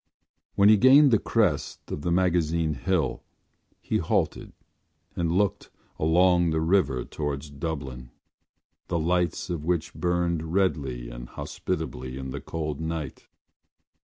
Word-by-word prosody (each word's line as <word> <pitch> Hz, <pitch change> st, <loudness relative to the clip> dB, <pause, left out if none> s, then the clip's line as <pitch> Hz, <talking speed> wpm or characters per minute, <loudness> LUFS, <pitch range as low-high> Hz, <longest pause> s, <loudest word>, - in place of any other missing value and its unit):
When 100 Hz, -, +5 dB
he 110 Hz, -, +7 dB
gained 135 Hz, +5 st, +7 dB
the 110 Hz, -, +4 dB
crest -, -, -1 dB
of 75 Hz, -, -4 dB
the 85 Hz, -, -1 dB
Magazine 85 Hz, -3 st, +1 dB
Hill 65 Hz, -, -1 dB, 0.6 s
he -, -, -1 dB
halted -, -, -1 dB, 0.6 s
and 85 Hz, -1 st, 0 dB
looked 100 Hz, +2 st, 0 dB, 0.3 s
along 85 Hz, +2 st, +4 dB
the 80 Hz, 0 st, 0 dB
river 80 Hz, -7 st, +1 dB
towards 75 Hz, -1 st, -4 dB
Dublin, 70 Hz, -4 st, -5 dB, 0.8 s
the 85 Hz, -, -1 dB
lights 90 Hz, +2 st, 0 dB
of 80 Hz, -4 st, -3 dB
which 85 Hz, -1 st, -1 dB
burned 85 Hz, -2 st, -1 dB
redly 70 Hz, -11 st, 0 dB
and -, -, -9 dB
hospitably 65 Hz, -8 st, -5 dB
in 65 Hz, -1 st, -6 dB
the -, -, -5 dB
cold 75 Hz, -3 st, -4 dB
night. 80 Hz, -3 st, -5 dB
80 Hz, 130 wpm, -26 LUFS, 70-90 Hz, 0.8 s, he